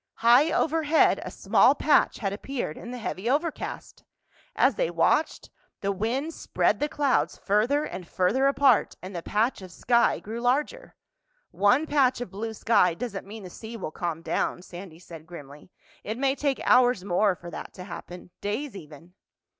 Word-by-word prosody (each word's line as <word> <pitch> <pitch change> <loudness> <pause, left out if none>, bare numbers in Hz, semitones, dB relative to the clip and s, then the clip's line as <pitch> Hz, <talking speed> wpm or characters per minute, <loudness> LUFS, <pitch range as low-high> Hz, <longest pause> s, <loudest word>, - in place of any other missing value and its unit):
High 245 +7 +5
overhead 320 0 +2
a - - -6
small - - +3
patch - - +3
had 195 -3 -2
appeared 240 - -4
in 235 - -9
the 250 - -6
heavy 220 -1 -4
overcast. 305 +4 -3 0.5
As 260 - +4
they 165 - -1
watched, 175 - 0 0.3
the 200 - 0
wind 240 - -2
spread - - 0
the 295 - -1
clouds 285 -3 0
further 225 +9 +1
and 180 - -7
further 230 +9 +1
apart 275 -4 +3
and 185 +1 -8
the 170 - -3
patch 215 +6 0
of 185 -1 -10
sky 235 +5 +2
grew 225 +3 -6
larger. 295 - -1 0.6
"One 245 +10 +3
patch 275 -5 +2
of 245 -7 -6
blue 220 +3 -5
sky 180 -7 +3
doesn't 200 -1 -6
mean 215 +1 -9
the 180 - -9
sea 225 +4 -9
will 185 - -5
calm 165 -1 -4
down," 180 - -2
Sandy 175 -2 -10
said 165 -2 -12
grimly. 150 -2 -12 0.3
"It 215 +2 -4
may 270 +1 +1
take 280 -1 -1
hours 245 -6 +4
more 200 +1 +2
for 170 0 -11
that - - -8
to 180 - -8
happen—days 200 +8 -6
even." 165 0 -12
220 Hz, 170 wpm, -26 LUFS, 180-265 Hz, 0.6 s, High